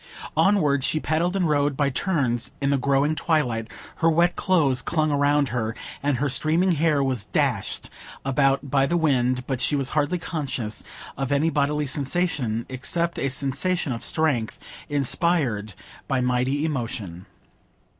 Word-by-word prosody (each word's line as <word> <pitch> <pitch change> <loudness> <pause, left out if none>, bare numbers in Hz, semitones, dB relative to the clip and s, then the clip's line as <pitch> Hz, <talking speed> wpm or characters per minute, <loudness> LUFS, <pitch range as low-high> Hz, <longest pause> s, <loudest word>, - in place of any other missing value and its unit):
Onward 150 -9 +3
she 155 - +1
paddled 165 +4 0
and 185 -3 +1
rowed 145 -2 +1
by 140 -1 +1
turns 130 - -1
in 140 0 0
the 140 - +3
growing 140 +3 +2
twilight; 130 -8 0 0.3
her 165 - +3
wet 170 +2 +3
clothes 150 -9 +2
clung 155 -2 0
round 145 -1 +2
her, 115 -2 -2 0.3
and 140 -2 0
her 145 +4 0
streaming 160 +7 +2
hair 155 -3 +2
was 130 -6 -1
dashed - - -1 0.3
about 135 0 +1
by 135 -1 +3
the 175 - +1
wind, 130 -5 +1
but 130 -2 -3
she 145 - +1
was 135 -2 0
hardly 155 +4 0
conscious 135 -10 -4 0.3
of 135 0 -3
any 150 +3 +2
bodily 150 +1 0
sensations,—except 140 - -1
a 135 - 0
sensation 140 +5 -1
of 115 - -6
strength, 145 -9 0 0.3
inspired 140 - +1 0.3
by 135 - 0
mighty 125 +4 0
emotion. 110 - -4
140 Hz, 145 wpm, -24 LUFS, 130-155 Hz, 0.3 s, Onward